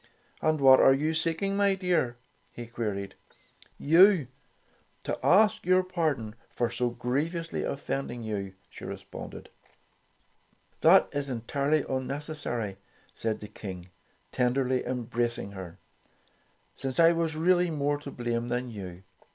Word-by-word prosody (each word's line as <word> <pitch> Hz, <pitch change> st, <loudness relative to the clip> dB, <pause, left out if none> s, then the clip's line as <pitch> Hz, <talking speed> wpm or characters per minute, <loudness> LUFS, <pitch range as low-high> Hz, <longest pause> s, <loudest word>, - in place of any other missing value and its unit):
"And 155 Hz, -1 st, +2 dB
what 130 Hz, -1 st, +8 dB
are 135 Hz, -, +6 dB
you 155 Hz, +3 st, 0 dB
seeking, 165 Hz, +5 st, 0 dB
my 200 Hz, -1 st, +3 dB
dear?" 175 Hz, -10 st, 0 dB, 0.3 s
he 120 Hz, -, -8 dB
queried. 105 Hz, -4 st, -4 dB, 0.6 s
"You, 165 Hz, -, +5 dB, 0.7 s
to -, -, -3 dB
ask 205 Hz, +2 st, +4 dB
your 185 Hz, +1 st, +4 dB
pardon 155 Hz, -12 st, -1 dB, 0.2 s
for 120 Hz, -1 st, -1 dB
so 120 Hz, +1 st, 0 dB
griev 125 Hz, +8 st, -2 dB
ously 165 Hz, -1 st, -3 dB
offending 135 Hz, -3 st, -3 dB
you," 100 Hz, -3 st, -4 dB
she -, -, -13 dB
responded. -, -, -8 dB, 1.3 s
"That -, -, +6 dB
is 140 Hz, -1 st, -3 dB
entirely 140 Hz, +5 st, 0 dB
unnecessary," 130 Hz, -6 st, -3 dB, 0.4 s
declared 110 Hz, -1 st, -3 dB
the 105 Hz, -, -7 dB
King, 95 Hz, -3 st, -8 dB, 0.4 s
tenderly 130 Hz, +1 st, +1 dB
embracing 120 Hz, -3 st, -2 dB
her, 95 Hz, -3 st, -9 dB, 1.0 s
"since 135 Hz, +2 st, -4 dB
I 165 Hz, 0 st, +7 dB
was 165 Hz, -2 st, -1 dB
really 175 Hz, +2 st, +3 dB
more 145 Hz, -2 st, 0 dB
to 145 Hz, -, -8 dB
blame 120 Hz, -2 st, -2 dB
than 125 Hz, 0 st, -2 dB
you. 95 Hz, -4 st, -8 dB
130 Hz, 125 wpm, -28 LUFS, 115-160 Hz, 1.3 s, what